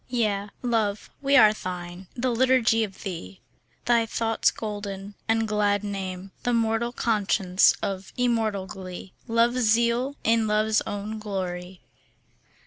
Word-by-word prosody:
Yea, 210 -5 0
Love, 220 -4 -1
we 280 0 +4
are 215 -4 +7
thine, 180 -2 -7
the 250 0 0
liturgy 240 -2 +3
of 195 -3 -7
thee. 130 - -6 0.5
Thy 235 -1 +4
thought's 225 0 +1
golden 205 -2 -6
and 225 0 +2
glad 205 -1 +1
name, 190 -2 -5
The 245 - 0
mortal 230 +1 +1
conscience 200 -5 +2
of 195 -1 -3
immortal 225 -5 +1
glee, 190 -1 -9
Love's 235 +2 +2
zeal 235 +4 +2
in 225 0 +3
Love's 215 +1 +2
own 205 +2 -4
glory. 185 -3 -5
215 Hz, 130 wpm, -25 LUFS, 195-230 Hz, 0.5 s, are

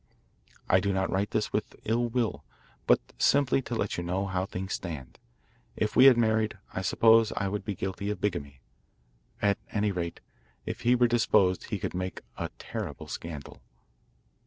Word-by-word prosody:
I 95 - +5
do 100 +2 0
not 95 0 0
write 100 +2 0
this 110 -1 -1
with 105 - -2
ill 120 +2 +1
will, 115 - -1 0.4
but - - +6 0.2
simply 140 -1 +3
to 120 - -5
let 105 -2 -1
you 85 - -2
know 90 +3 -1
how 95 -1 -2
things 95 +1 -4
stand. 75 -8 -6 0.6
If 105 - -1
we 130 - +8
had 130 -3 +8
married, 110 -2 +2 0.2
I 95 - -2
suppose 115 +4 +5
I 100 - 0
would 100 +1 -3
be 100 0 -3
guilty 95 +2 -3
of 105 - -3
bigamy. 70 -9 -3 0.8
At 100 -1 +3
any 105 -1 +1
rate, 85 -3 -4 0.5
if - - -5
he 120 +1 +4
were 120 0 +4
disposed 100 -6 +3
he 105 - -3
could 90 - -4
make 90 +1 -4
a - - -4
terrible - - -6
scandal. 80 -4 -7
100 Hz, 175 wpm, -28 LUFS, 90-110 Hz, 0.8 s, we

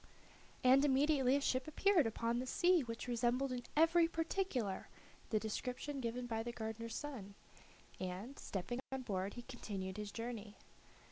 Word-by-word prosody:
And 260 +2 +7
immediately 275 -1 +4
a 285 - +2
ship 255 -1 +1
appeared 340 - +4
upon 230 +1 0
the 255 - -3
sea 355 +4 +4
which 230 -1 -5
resembled 245 +3 +1
in 250 -1 -2 0.2
every 330 +1 +6
particular 325 - -1 0.4
the 215 - +2
description 250 +6 -3
given 245 0 -2
by 225 -2 -1
the 240 +1 -3
gardener's 225 0 -4
son, 230 -10 -6 0.6
and, 190 +9 -5
stepping 200 +6 -3
on 265 -1 -3
board, 195 -3 -2
he 240 - -6
continued 200 -6 -5
his 210 -1 -4
journey. 225 -3 -5
245 Hz, 150 wpm, -38 LUFS, 220-275 Hz, 0.6 s, And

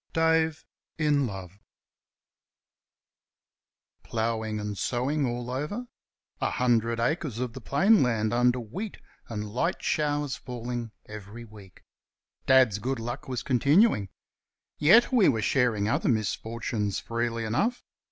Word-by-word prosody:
DAVE 160 -1 +2 0.3
IN 145 -4 +2
LOVE 95 -2 -8 2.4
Ploughing 110 -1 -2
and 105 0 -4
sowing 130 +8 0
all 120 0 -4
over. 150 - -3 0.6
A - - +1
hundred 115 -2 +1
acres 150 -1 -1
of 125 -1 -3
the 130 - -8
plain 190 - +4
land 115 -3 +1
under 125 +1 +3
wheat 185 - -6 0.3
and 105 -2 -5
light 170 - -1
showers 145 -2 0
falling 120 -1 -5 0.2
every 110 +2 -9
week. 105 -4 -15 0.6
Dad's 130 -6 +5
good 130 +5 -2
luck 120 +6 -5
was 125 -3 -3
continuing. 140 - +3 0.7
Yet 205 - +6
we 235 -7 +5
were 110 -5 0
sharing 115 -5 +2
other 110 - +1
misfortunes 110 -1 -1
freely 115 0 -2
enough. 210 - 0
120 Hz, 120 wpm, -27 LUFS, 110-145 Hz, 2.4 s, Yet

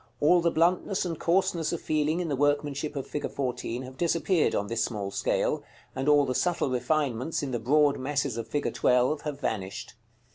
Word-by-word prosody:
All 175 +4 +5
the 170 - +3
bluntness 180 +4 +1
and 165 -3 -4
coarseness 170 -2 +1
of 170 - -2
feeling 155 +2 0
in 175 - -2
the 145 - -1
workmanship 145 +1 0
of 135 - -3
fig. 150 - -4
14 125 -2 -3
have 130 0 -10
disappeared 170 0 +2
on 100 - 0
this 115 +2 -1
small 100 -4 -3
scale, - - 0 0.3
and 135 +2 0
all 145 -1 +5
the 130 - -1
subtle 170 -3 0
refinements 130 +2 -1
in 135 - -3
the 120 - -1
broad 145 +4 +3
masses 140 -2 -1
of 115 -1 -4
fig. 145 - -2
12 125 +4 +2
have 145 -2 -5
vanished. 100 -7 -4
145 Hz, 190 wpm, -27 LUFS, 125-160 Hz, 0.3 s, All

